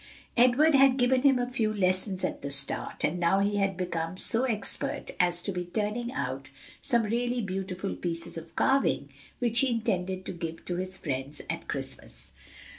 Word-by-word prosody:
Edward 255 Hz, +6 st, +5 dB
had 270 Hz, -1 st, +6 dB
given 255 Hz, 0 st, +3 dB
him 275 Hz, -1 st, +5 dB
a 245 Hz, 0 st, -1 dB
few 235 Hz, -4 st, 0 dB
lessons 185 Hz, -1 st, +1 dB
at -, -, -2 dB
the 140 Hz, -, -4 dB
start, 140 Hz, 0 st, +1 dB
and 170 Hz, +4 st, 0 dB
now 175 Hz, +3 st, +3 dB
he 205 Hz, +1 st, +1 dB
had 195 Hz, -2 st, 0 dB
become 170 Hz, -1 st, -3 dB
so 230 Hz, +6 st, +3 dB
expert 215 Hz, -5 st, -1 dB
as 175 Hz, -1 st, +3 dB
to 200 Hz, -, -1 dB
be 180 Hz, -1 st, -3 dB
turning 215 Hz, +6 st, -2 dB
out 135 Hz, 0 st, -4 dB, 0.3 s
some 235 Hz, -2 st, +2 dB
really 240 Hz, +3 st, -1 dB
beautiful 190 Hz, -2 st, -3 dB
pieces 170 Hz, -1 st, -3 dB
of 165 Hz, 0 st, -9 dB
carving, 270 Hz, 0 st, +2 dB, 0.3 s
which 235 Hz, -1 st, +3 dB
he 270 Hz, -, +4 dB
intended 190 Hz, -5 st, -1 dB
to -, -, -4 dB
give 165 Hz, -2 st, -6 dB
to 175 Hz, -, -3 dB
his 185 Hz, +1 st, -3 dB
friends 140 Hz, -1 st, -3 dB
at -, -, -6 dB
Christmas. -, -, -3 dB
195 Hz, 180 wpm, -28 LUFS, 175-240 Hz, 0.3 s, had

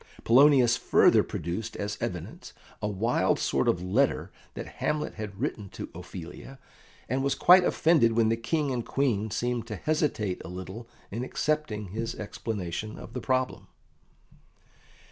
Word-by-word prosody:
Polonius 125 Hz, -1 st, +6 dB
further -, -, +5 dB
produced 100 Hz, +7 st, -4 dB
as 105 Hz, +1 st, -3 dB
evidence -, -, -5 dB, 0.3 s
a 105 Hz, -, 0 dB
wild 105 Hz, +4 st, +1 dB
sort -, -, 0 dB
of 85 Hz, -, +1 dB
letter 90 Hz, -, +1 dB, 0.2 s
that -, -, -5 dB, 0.2 s
Hamlet 150 Hz, 0 st, -1 dB
had 105 Hz, -3 st, -7 dB
written 110 Hz, -7 st, -3 dB
to -, -, -7 dB
Ophelia, 90 Hz, +8 st, -9 dB, 0.5 s
and 130 Hz, +3 st, -1 dB
was 140 Hz, -1 st, +1 dB
quite 180 Hz, +5 st, +7 dB
offended 155 Hz, -10 st, +3 dB
when 115 Hz, -1 st, +3 dB
the 115 Hz, -, +2 dB
King 145 Hz, +5 st, -1 dB
and 120 Hz, -2 st, -2 dB
Queen 115 Hz, -7 st, 0 dB
seemed 120 Hz, +2 st, -2 dB
to 110 Hz, -, -4 dB
hesitate 110 Hz, -7 st, -1 dB
a -, -, -8 dB
little 95 Hz, +6 st, -8 dB, 0.2 s
in 115 Hz, +5 st, -3 dB
accepting 130 Hz, -8 st, -2 dB
his 115 Hz, +4 st, -4 dB
explanation 105 Hz, -1 st, -5 dB
of -, -, -10 dB
the 125 Hz, -, -4 dB
problem. 130 Hz, -1 st, -1 dB
115 Hz, 145 wpm, -28 LUFS, 105-135 Hz, 0.5 s, quite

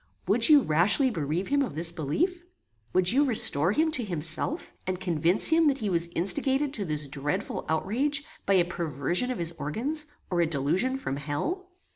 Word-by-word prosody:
Would -, -, +4 dB
you 295 Hz, -3 st, +6 dB
rashly 200 Hz, -, +3 dB
bereave 160 Hz, 0 st, -3 dB
him 285 Hz, 0 st, +1 dB
of 260 Hz, -, -3 dB
this 165 Hz, +1 st, +1 dB
belief? 240 Hz, -, -2 dB, 0.5 s
Would 185 Hz, 0 st, +3 dB
you 275 Hz, +4 st, +3 dB
restore 185 Hz, -, +4 dB
him 315 Hz, +8 st, +1 dB
to 255 Hz, -5 st, +1 dB
himself, 170 Hz, -, -2 dB, 0.2 s
and 185 Hz, -1 st, -3 dB
convince 175 Hz, 0 st, +1 dB
him 325 Hz, 0 st, +3 dB
that 275 Hz, -2 st, +1 dB
he 215 Hz, -6 st, -3 dB
was 170 Hz, -1 st, 0 dB
instigated 270 Hz, -, +2 dB
to 205 Hz, -6 st, -4 dB
this 150 Hz, -2 st, -1 dB
dreadful 150 Hz, +8 st, -4 dB
outrage 260 Hz, -, -1 dB, 0.2 s
by 195 Hz, -, +3 dB
a 175 Hz, -2 st, +3 dB
perversion 170 Hz, -, -1 dB
of 255 Hz, -, -3 dB
his 170 Hz, -1 st, -1 dB
organs, 285 Hz, -, -1 dB, 0.2 s
or 175 Hz, -1 st, +1 dB
a 170 Hz, -, +1 dB
delusion 165 Hz, -, 0 dB
from 140 Hz, -, -5 dB
hell? 280 Hz, -, -4 dB
185 Hz, 180 wpm, -26 LUFS, -, 0.5 s, you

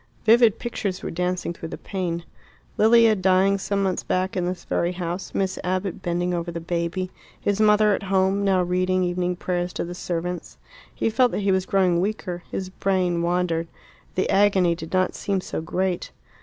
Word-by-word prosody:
Vivid 225 Hz, -1 st, +6 dB
pictures 200 Hz, -6 st, -4 dB
were -, -, -3 dB
dancing 180 Hz, 0 st, -2 dB
through 165 Hz, -1 st, -8 dB
the -, -, -6 dB
pain 175 Hz, -3 st, -3 dB, 0.5 s
Lilia 225 Hz, +1 st, +6 dB
dying 190 Hz, +1 st, +3 dB
some 200 Hz, 0 st, -1 dB
months 190 Hz, -2 st, 0 dB
back 185 Hz, +1 st, -1 dB
in 180 Hz, -2 st, 0 dB
this 180 Hz, 0 st, -4 dB
very 175 Hz, +1 st, 0 dB
house, 180 Hz, +1 st, -5 dB
Miss 190 Hz, -1 st, -1 dB
Abbott 185 Hz, 0 st, -2 dB
bending 175 Hz, +1 st, -1 dB
over 170 Hz, 0 st, -2 dB
the 170 Hz, -, -4 dB
baby, 170 Hz, +2 st, -2 dB, 0.3 s
his 205 Hz, +1 st, 0 dB
mother 210 Hz, 0 st, +5 dB
at -, -, -1 dB
home, 195 Hz, 0 st, +1 dB
now 190 Hz, -2 st, +3 dB
reading 185 Hz, +1 st, +1 dB
evening 180 Hz, 0 st, -1 dB
prayers 175 Hz, 0 st, -2 dB
to -, -, -3 dB
the 175 Hz, -, -6 dB
servants. 175 Hz, 0 st, -4 dB, 0.4 s
He 225 Hz, -, 0 dB
felt 250 Hz, +2 st, +4 dB
that -, -, -1 dB
he 200 Hz, -, +3 dB
was 190 Hz, 0 st, +1 dB
growing 180 Hz, -3 st, +3 dB
weaker; 190 Hz, -3 st, -3 dB
his 190 Hz, -1 st, -4 dB
brain 185 Hz, -3 st, 0 dB
wandered; 170 Hz, -1 st, 0 dB, 0.5 s
the 185 Hz, -, +1 dB
agony 195 Hz, -3 st, +4 dB
did 165 Hz, -1 st, -8 dB
not 185 Hz, -1 st, +1 dB
seem 200 Hz, -1 st, -1 dB
so 180 Hz, -, -4 dB
great. 180 Hz, +2 st, -2 dB
185 Hz, 185 wpm, -24 LUFS, 175-195 Hz, 0.5 s, Vivid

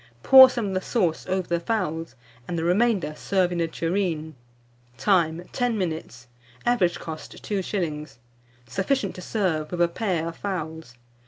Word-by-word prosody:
Pour 265 Hz, -1 st, +10 dB
some 235 Hz, -5 st, -2 dB
of -, -, -3 dB
the 185 Hz, -, 0 dB
sauce 180 Hz, -7 st, -1 dB
over 185 Hz, -1 st, -1 dB
the 170 Hz, 0 st, 0 dB
fowls, 165 Hz, -, -2 dB, 0.3 s
and 175 Hz, -, -3 dB
the 165 Hz, -, -1 dB
remainder 185 Hz, -3 st, +2 dB
serve 185 Hz, 0 st, 0 dB
in 175 Hz, -1 st, -1 dB
a 165 Hz, -, +1 dB
tureen. 165 Hz, -2 st, -2 dB, 0.6 s
Time. 175 Hz, -2 st, +1 dB
10 245 Hz, -3 st, 0 dB
minutes. 160 Hz, -, -4 dB, 0.4 s
Average 195 Hz, -8 st, +2 dB
cost, 160 Hz, -1 st, -7 dB
2s. 175 Hz, -, -3 dB, 0.5 s
Sufficient 195 Hz, -, -1 dB
to 185 Hz, -, -9 dB
serve 175 Hz, -7 st, -1 dB
with 175 Hz, -, -4 dB
a 175 Hz, -, +5 dB
pair 170 Hz, -3 st, -2 dB
of 165 Hz, -, -10 dB
fowls. 160 Hz, -9 st, -5 dB
175 Hz, 155 wpm, -25 LUFS, 160-200 Hz, 0.6 s, Pour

